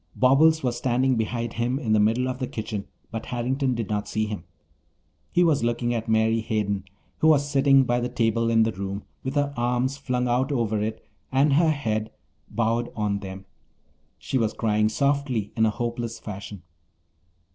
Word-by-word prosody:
Bobbles 155 +5 +4
was 125 -2 0
standing 130 +1 +1
behind 115 +1 -2
him 120 +3 0
in 115 -7 0
the 110 - +4
middle 115 +5 +2
of 130 0 -3
the 130 - -2
kitchen 110 -2 -5 0.2
but 115 0 -5
Harrington 130 +2 -1
did 115 -3 -3
not 105 -1 -2
see 110 0 -1
him. 105 -5 -5 0.9
He 180 - +4
was 155 -7 +3
looking 120 +1 0
at 115 -1 -3
Mary 110 +1 +3
Hayden, 100 -3 -1 0.3
who 155 - +4
was 145 -2 +4
sitting 135 -1 +5
by 120 -1 +1
the 120 0 -2
table 115 0 +1
in 115 -1 +4
the 115 - +1
room 100 +1 -5 0.2
with 130 +2 -3
her 145 -1 +1
arms 125 +2 0
flung 125 -2 -1
out 125 +4 +1
over 110 -5 0
it 110 +1 -4 0.3
and 135 +2 +3
her 160 +3 +4
head 110 -8 -1 0.4
bowed 115 +2 0
on 105 -2 -1
them. 95 0 -8 0.7
She 130 - -2
was 110 -2 0
crying 105 -1 +2
softly 140 -4 0
in 110 0 +3
a - - +3
hopeless 120 0 -3
fashion. 100 -3 -8
120 Hz, 180 wpm, -25 LUFS, 110-130 Hz, 0.9 s, sitting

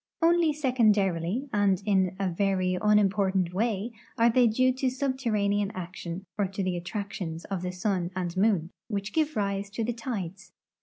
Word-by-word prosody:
Only 335 -1 +4
secondarily 215 - +1
and 200 -3 +3
in 190 -3 +2
a 195 - +1
very 185 0 +1
unim 210 -2 +4
portant 190 -3 0
way 220 +2 -1 0.3
are 230 +1 +5
the}'' 245 0 +5
due 255 +3 +3
to 265 -1 +1
subterranean 230 -7 0
action 180 0 -6
or 200 - +2
to 195 +1 -4
the 185 -1 0
attrac 200 +3 -4
tions 165 -3 -5
of 195 -3 -3
the 180 0 -3
sun 180 -1 -1
and 180 -2 -3
moon, 190 -4 +2 0.2
which 205 -2 -3
give 310 -1 +1
rise 200 -1 -1
to 225 +3 -3
the 240 +2 -1
tides. 195 -6 -6
200 Hz, 170 wpm, -28 LUFS, 185-230 Hz, 0.3 s, are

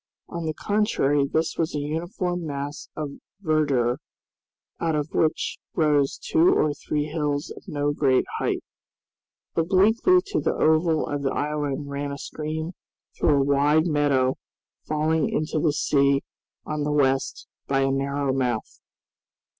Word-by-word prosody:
On 170 -1 -4
the 155 - -2
contrary 145 -10 +1
this 160 +3 -1
was 160 -1 0
a - - 0
uniform 175 +4 -2
mass 145 0 -5
of 150 -2 -5 0.2
verdure, 145 -9 +1 0.8
out 165 -2 0
of 150 0 -1
which 155 - 0 0.2
rose 150 -3 +2
two 335 +2 +3
or 150 - +2
three 145 +1 -2
hills 150 -1 -2
of - - -14
no 145 0 0
great 135 -3 +2
height. - - -1 0.9
Obliquely 200 - +4
to 400 -2 -1
the - - 0
oval 160 0 +3
of 145 -1 -3
the 135 - 0
island 145 -1 -2
ran 140 0 -3
a 140 - -5
stream 155 +3 -4 0.4
through 145 -3 +3
a - - +3
wide 145 +3 +3
meadow 145 -5 +2 0.5
falling 155 +1 +1
into 155 0 -1
the 155 -1 +2
sea 140 -1 +2 0.4
on 150 -1 -3
the 150 - -1
west 135 -2 +1 0.2
by 135 0 +2
a 135 0 +2
narrow 140 0 0
mouth. 125 -4 -2
150 Hz, 145 wpm, -25 LUFS, 140-160 Hz, 0.9 s, Obliquely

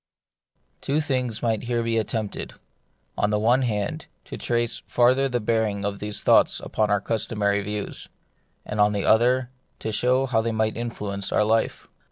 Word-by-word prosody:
^pWO 150 +3 0
things 125 -5 -1
might 115 -2 +1
be 120 - -9
here 120 -1 0 0.2
attempted: 110 -1 -4 0.6
on 105 - +1
the 105 - +1
one 120 +5 +3
hand, 105 -5 -2 0.2
to - - -7
trace 120 -1 0
farther 130 +3 +3
the 125 -1 0
bearing 105 -2 0
of 100 -1 -3
these 105 0 -3
thoughts - - +4
upon 110 -1 -1
our 105 -1 +3
custom 110 0 -2
ary 100 0 +2
views; 105 0 -5 0.6
and 105 0 -1
on 105 0 +4
the 100 - -1
other, 125 +3 +3 0.3
to 110 - -4
show 125 +4 +2
how 120 -4 +1
they 115 +1 -1
might 110 0 0
influence 105 -4 -4
our - - +3
life. 110 +1 0
110 Hz, 175 wpm, -24 LUFS, 105-120 Hz, 0.6 s, thoughts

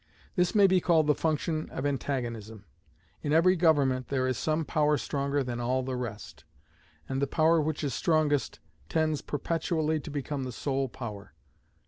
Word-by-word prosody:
This 180 +1 +1
may 205 -2 +7
be 185 -1 +4
called 165 -3 +3
the 150 - +4
function 155 +1 -1
of 130 - -4
Antagonism. 120 -7 -3 0.6
In 145 - -2
every 170 +4 +5
government 140 -7 +2
there 130 -2 0
is 130 0 0
some 155 +4 -1
power 150 -1 +2
stronger 140 +1 -1
than 120 -1 -4
all 130 +2 0
the 130 0 -3
rest; 105 - -6 0.6
and 135 +1 -2
the 140 - +1
power 160 +3 +3
which 155 0 -2
is 140 - -1
strongest 150 -6 +1 0.3
tends 155 -2 +1
perpetually 160 +1 -1
to 150 - -8
become 145 -1 -3
the 130 - -4
sole 135 +1 -2
power. 105 -5 -8
145 Hz, 165 wpm, -29 LUFS, 130-155 Hz, 0.6 s, may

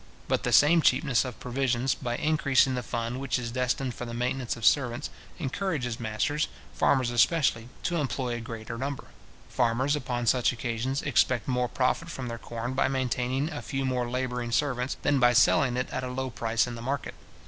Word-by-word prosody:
But - - +1
the - - -1
same 165 +3 +6
cheapness 140 -6 +3
of 125 -3 -7
provisions, 125 0 0
by 120 -1 -3
increasing 140 -4 +3
the 125 - -1
fund 120 +2 -3
which 135 -2 -1
is 120 -2 -4
destined 125 +1 -1
for - - -7
the 115 -1 -5
maintenance 125 0 -2
of 115 - -4
servants, 125 -4 +2 0.3
encourages 135 - -2
masters, 120 +7 -1 0.3
farmers 130 -3 +2
especially, 120 -2 +2
to 175 - 0
employ 130 -4 -1
a 120 - -3
greater 115 0 -7
number. 140 +1 -4 0.4
Farmers, 125 +5 +1
upon 125 -4 -3
such 125 +1 +3
occasions, 120 +3 -2
expect 130 -4 +2
more 125 -1 +1
profit 130 +7 0
from 130 -6 -5
their 115 0 -5
corn 120 +2 -5
by 130 - +2
maintaining 130 +2 -1
a 145 - -5
few 135 -2 -3
more 125 -2 -1
labouring 125 -1 -2
servants, 125 0 0
than 145 -2 +3
by 120 -1 +5
selling 120 +1 +4
it 125 - -1
at 130 - -3
a - - -2
low 130 +1 -3
price 115 -1 0
in 120 - -6
the 115 - -7
market. 135 +4 -3
125 Hz, 190 wpm, -28 LUFS, 120-135 Hz, 0.4 s, same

